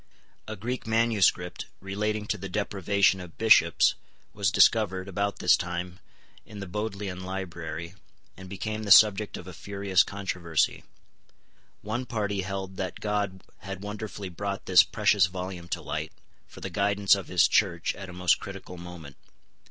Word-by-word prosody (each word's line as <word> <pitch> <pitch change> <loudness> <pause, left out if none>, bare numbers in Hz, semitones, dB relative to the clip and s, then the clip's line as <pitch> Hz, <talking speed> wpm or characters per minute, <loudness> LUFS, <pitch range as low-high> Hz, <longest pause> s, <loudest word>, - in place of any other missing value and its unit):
A 110 - -5
Greek 120 +4 -4
manuscript, 110 -6 +1
relating 105 +2 -2
to 105 - -2
the 95 +1 -6
deprivation 100 0 +1
of 90 -2 -11
bishops, 105 -7 +5 0.4
was 100 -3 +1
discovered, 95 -1 +3
about 100 +1 -2
this 90 - +5
time, 90 +1 -5 0.4
in 105 +1 -11
the 100 - -5
Bodleian 100 -1 -4
Library, 85 -3 -5 0.4
and 95 0 -11
became 110 +3 -4
the 105 - -5
subject 105 +1 +6
of - - -10
a 95 - -9
furious 100 0 +1
controversy. 90 -4 -1 1.0
One 120 +5 -3
party 105 -4 -1
held 95 0 -5
that 95 -1 -4
God 100 -3 -2 0.2
had 95 0 -7
wonderfully 105 -1 -6
brought 100 +2 -4
this 90 -1 +7
precious 105 -3 +3
volume 90 -1 -6
to - - -4
light, 75 +2 -4 0.4
for - - -14
the - - -5
guidance 100 0 +3
of 100 -2 0
His 90 -2 +4
Church 85 -5 +1
at 95 -1 -9
a - - -9
most 90 0 +2
critical 95 -2 -9
moment. 85 -5 -10
95 Hz, 150 wpm, -27 LUFS, 90-105 Hz, 1.0 s, this